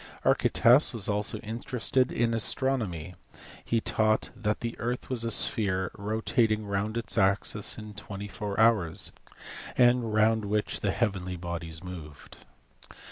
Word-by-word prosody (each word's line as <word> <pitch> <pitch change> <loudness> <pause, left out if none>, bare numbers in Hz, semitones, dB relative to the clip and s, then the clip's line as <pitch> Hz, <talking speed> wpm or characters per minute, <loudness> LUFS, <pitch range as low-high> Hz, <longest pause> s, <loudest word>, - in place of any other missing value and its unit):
Archytas 125 +5 +4
was 105 -5 +2
also 105 +2 +1
interested 125 +3 -1
in 115 0 0
astronomy; 110 - 0 0.5
he 115 - 0
taught 110 -1 +1
that 105 -2 -2
the 115 0 -4
earth 120 +4 -3
was 120 -3 0
a 115 - -1
sphere 95 -5 +1
rotating 110 +1 0
round 100 +3 -2
its 115 -1 0
axis 100 +2 +1
in 105 -1 -9
24 105 0 -6
hours, 110 -8 +3 0.7
and 120 -2 +4
round 110 0 +2
which 105 +1 -1
the 100 - -1
heavenly 95 -4 -1
bodies 85 -1 -6
moved. 80 -5 -10
105 Hz, 130 wpm, -28 LUFS, 100-115 Hz, 0.7 s, Archytas